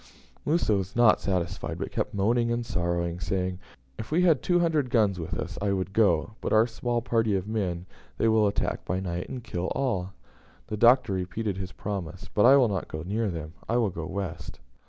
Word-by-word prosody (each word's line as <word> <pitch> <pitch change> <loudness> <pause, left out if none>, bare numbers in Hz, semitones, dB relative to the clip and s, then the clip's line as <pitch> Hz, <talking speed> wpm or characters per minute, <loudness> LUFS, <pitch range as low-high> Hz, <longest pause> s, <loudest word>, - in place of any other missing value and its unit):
Musa 150 -9 +2
was 95 0 -3
not 120 -2 +5
satisfied, 90 -3 -2
but - - -4
kept - - -2
moaning 115 +4 +2
and 120 0 -1
sorrowing, 85 -2 -1
saying, 90 +2 -2 0.4
"If 110 - -6
we 170 +4 +2
had 165 -6 +4
two 175 - +2
hundred 155 -6 +1
guns 105 -7 +2
with 80 - -4
us - - -5
I 100 -1 +1
would 95 0 -2
go; 100 -4 +3
but - - -3
our 110 +1 +5
small 120 0 -2
party 115 -4 +1
of 95 +1 -2
men 95 -6 -2 0.3
they 115 - +2
will 110 -1 +4
attack 100 - -1
by 95 +2 -2
night, 90 -2 -4
and 125 -2 -6
kill 90 -3 -3
all." 95 -9 -1 0.5
The 105 - -4
Doctor 120 -1 +5
repeated 95 +2 -2
his 95 -1 -5
promise, 95 -3 -5
"But 105 +3 +5
I 135 - +8
will 130 -3 +5
not 95 -4 -2
go 80 0 -6
near 105 +4 -1
them; 80 -3 -6 0.2
I 120 - +2
will 110 -5 +1
go 80 -2 -5
west." 90 -6 -5
100 Hz, 205 wpm, -27 LUFS, 90-115 Hz, 0.5 s, I